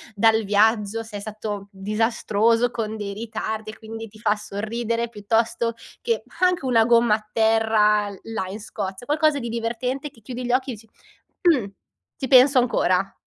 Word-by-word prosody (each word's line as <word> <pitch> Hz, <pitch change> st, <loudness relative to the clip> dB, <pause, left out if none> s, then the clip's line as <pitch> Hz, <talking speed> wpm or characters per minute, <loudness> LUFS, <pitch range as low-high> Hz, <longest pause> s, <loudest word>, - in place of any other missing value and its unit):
dal 220 Hz, +1 st, +4 dB
viaggio, 210 Hz, +1 st, +2 dB
se 220 Hz, -2 st, -8 dB
è -, -, -6 dB
stato 210 Hz, -1 st, -6 dB
disastroso 225 Hz, +3 st, +1 dB
con 220 Hz, -2 st, -3 dB
dei 205 Hz, -2 st, -5 dB
ritardi 220 Hz, 0 st, -4 dB
e 220 Hz, -, -15 dB
quindi 225 Hz, 0 st, -8 dB
ti 215 Hz, +1 st, -17 dB
fa 210 Hz, -1 st, +1 dB
sorridere, 230 Hz, +3 st, -3 dB
piuttosto 230 Hz, +2 st, 0 dB, 0.3 s
che 465 Hz, -1 st, -1 dB, 0.2 s
anche 365 Hz, -4 st, +2 dB
una 230 Hz, -3 st, +4 dB
gomma 235 Hz, -2 st, +4 dB
a 215 Hz, 0 st, -9 dB
terra 220 Hz, -1 st, +3 dB
là 225 Hz, -4 st, -4 dB
in 205 Hz, +3 st, -7 dB
Scozia. 200 Hz, 0 st, -6 dB
Qualcosa 300 Hz, +1 st, +2 dB
di 235 Hz, -3 st, -4 dB
divertente 240 Hz, +5 st, -3 dB
che 230 Hz, -, -22 dB
chiudi 250 Hz, +3 st, -6 dB
gli 245 Hz, -, 0 dB
occhi 260 Hz, +1 st, +1 dB
e -, -, -2 dB
dici: 220 Hz, +1 st, -17 dB, 0.6 s
“Mh, 260 Hz, -10 st, +3 dB, 0.5 s
ci 265 Hz, -, -4 dB
penso 265 Hz, +1 st, +7 dB
ancora.” 195 Hz, -6 st, +1 dB
225 Hz, 165 wpm, -23 LUFS, 210-240 Hz, 0.6 s, penso